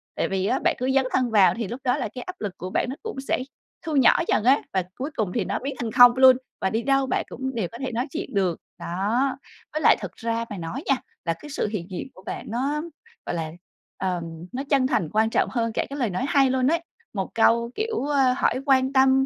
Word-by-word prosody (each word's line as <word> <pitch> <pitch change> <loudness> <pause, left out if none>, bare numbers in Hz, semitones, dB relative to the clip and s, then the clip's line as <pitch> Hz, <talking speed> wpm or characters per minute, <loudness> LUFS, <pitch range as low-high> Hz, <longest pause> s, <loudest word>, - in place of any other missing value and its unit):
Tại - - 0
vì 190 -1 0
á, - - +1
bạn - - +3
cứ 255 +1 0
dấn 270 -1 +4
thân 250 -2 +1
vào 200 -4 +6
thì 230 -3 -2
lúc 240 +6 -6
đó 250 +2 +2
là 245 -6 -2
cái 250 - -5
áp 365 +6 -7
lực 205 -3 -3
của 185 - -5
bạn 245 - 0
nó 265 - -4
cũng 445 -7 -5
sẽ - - +1 0.5
thu 315 - -2
nhỏ 265 -4 +6
dần - - +2
á, 265 +4 +5
và 190 -1 +1
cuối 275 +4 -4
cùng 210 -5 -1
thì 220 -6 0
nó 200 +3 -2
biến 275 +1 -4
thành 230 -2 -2
0 245 +1 +8
luôn. 260 -1 +8 0.2
Và 190 - +1
đi 225 +3 -1
đâu 275 -1 +2
bạn 255 - 0
cũng 265 +1 -5
đều 215 -6 -1
có 235 - -8
thể 265 0 -4
nói 245 +4 -1
chuyện 335 -4 -5
được. 185 -4 +1 0.2
Đó. 215 +11 0 0.4
Với 310 - -1
lại - - +6
thực 195 -3 -5
ra 230 0 -2
mà 205 - -6
nói 180 - -5
nha, 275 - +3 0.3
là 165 - +1
cái 295 - -10
sự 275 - -1
hiện 205 -5 -4
diện 185 - -4
của 185 - -16
bạn - - -6
nó, 275 +6 -1 0.4
gọi 175 - -3
là, 160 -2 -3 0.5
ờm, 180 -3 -2 0.3
nó 260 +2 -3
chân 270 -3 +3
thành 165 - 0
quan 220 +1 +3
trọng - - +1
hơn 230 -2 -1
cả - - 0
cái 280 +1 -6
lời 235 -5 +1
nói 185 +8 -2
hay 275 -2 +4
luôn 255 0 +2
ấy. 335 +4 +2 0.3
Một 195 -3 -2
câu, 235 +1 +3
kiểu, 440 - -2
ơ, 275 -3 +3
hỏi - - +2
quan 265 -1 +3
tâm, 265 0 +5
245 Hz, 260 wpm, -24 LUFS, 205-270 Hz, 0.5 s, 0